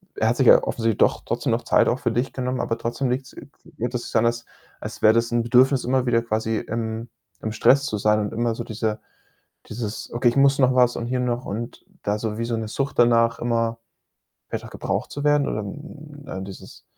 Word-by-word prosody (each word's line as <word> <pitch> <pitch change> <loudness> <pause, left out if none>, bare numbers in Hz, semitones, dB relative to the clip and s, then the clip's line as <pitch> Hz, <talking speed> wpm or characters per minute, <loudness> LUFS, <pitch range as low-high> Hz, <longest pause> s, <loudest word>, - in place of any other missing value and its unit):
er - - +1
hat - - 0
sich - - +3
ja - - +8
offensichtlich 115 -2 -1
doch - - +2
trotzdem - - -1
noch - - 0
Zeit - - +3
auch 125 - +1
für 120 - 0
dich 120 +4 -1
genommen, 130 0 -2
aber 115 - -2
trotzdem 120 +3 -2
liegt's 130 +1 -3
äh, - - -11 0.3
hört 120 +2 -3
es 125 - -2
sich - - -9
an, 115 0 +4
als 120 0 0 0.4
als - - -7
wäre 110 - +7
das 115 +1 +1
'n 120 0 +1
Bedürfnis, 125 +3 +4
immer 130 0 +1
wieder 115 -1 +3
quasi 110 0 -1
im 115 +1 -4 0.3
im 110 - -3
Stress 135 +5 +4
zu 110 - -2
sein 105 +1 +2
und 105 - -3
immer 115 0 0
so 120 - -5
diese 110 -1 -2 0.7
dieses: 110 -1 -5
„Okay, 120 +1 +2
ich 120 - 0
muss 140 0 +4
noch 130 -1 +4
was 125 -1 +4
und 115 - -3
hier 125 +1 -1
noch“ 125 0 -1
und 115 +4 -6 0.2
da 105 +1 -1
so 110 0 -3
wie 115 - -1
so 115 -1 -1
'ne 110 -1 -4
Sucht 135 +5 -3
danach, 115 -1 +4
immer 115 -1 0 0.7
wieder - - -5
gebraucht - - -3
zu 145 - -5
werden 145 -1 +3
oder, - - -2
hm, 145 - -10
äh, 95 - -5
dieses 95 -1 -11
120 Hz, 230 wpm, -23 LUFS, 110-125 Hz, 0.7 s, ja